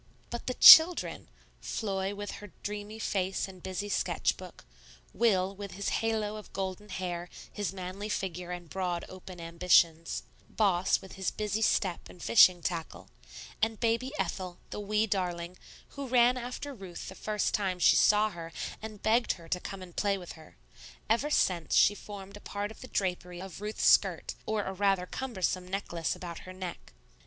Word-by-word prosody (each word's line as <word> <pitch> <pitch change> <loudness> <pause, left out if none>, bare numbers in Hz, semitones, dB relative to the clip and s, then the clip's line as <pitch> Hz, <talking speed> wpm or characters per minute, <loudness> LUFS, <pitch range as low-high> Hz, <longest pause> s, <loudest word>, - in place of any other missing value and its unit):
But 240 - -5
the 255 - -1
children! 330 +2 +8 0.3
Floy 195 -2 -2
with 205 0 -5
her 205 -2 -11
dreamy 210 +1 -5
face 190 -3 -1
and 185 -2 -12
busy 190 +2 -4
sketch 205 - 0
book, - - -12 0.5
Will 195 -4 +2
with 200 -1 -7
his 200 0 -2
halo 215 -2 -1
of 215 - -11
golden 195 +2 -4
hair, 175 -2 -4 0.2
his 205 -5 -2
manly 190 +2 -6
figure 180 -3 -3
and 175 -1 -6
broad, 180 -1 -2
open 185 -1 -10
ambitions, 170 -1 +2 0.3
Boss 190 -4 +2
with 190 - -11
his 190 - 0
busy 210 0 -2
step 195 -4 +1
and 180 - -14
fishing 180 -2 +6
tackle, 170 -3 -4 0.5
and 225 -1 0
baby 235 +3 0
Ethel, 185 -2 -3
the - - -4
wee 210 +1 +1
darling, 180 -4 -2 0.3
who 280 -1 -6
ran 245 0 +4
after 250 +3 -5
Ruth 190 -7 -9
the - - -7
first 210 +2 -1
time 190 -3 0
she 180 - +5
saw 210 +1 +4
her 165 -2 -8 0.3
and 215 -2 -8
begged 235 +2 +3
her 170 -1 -13
to 180 - 0
come 190 +1 -7
and 175 -2 -13
play 200 -1 +1
with 180 -2 -9
her; 160 -1 -14 0.5
ever 250 +6 +2
since, 180 - +1
she 205 - +6
formed 200 -1 -10
a 205 - -11
part 205 +1 -4
of - - -14
the 255 - -8
drapery 180 -4 -2
of 190 0 -8
Ruth's 210 +1 -2
skirt - - +4
or 215 -1 0
a 190 - -4
rather 195 -1 +1
cumbersome 185 -6 -2
necklace 175 -4 -2
about 170 -2 -7
her 185 - -10
neck. 185 -2 -8
195 Hz, 175 wpm, -30 LUFS, 180-210 Hz, 0.5 s, children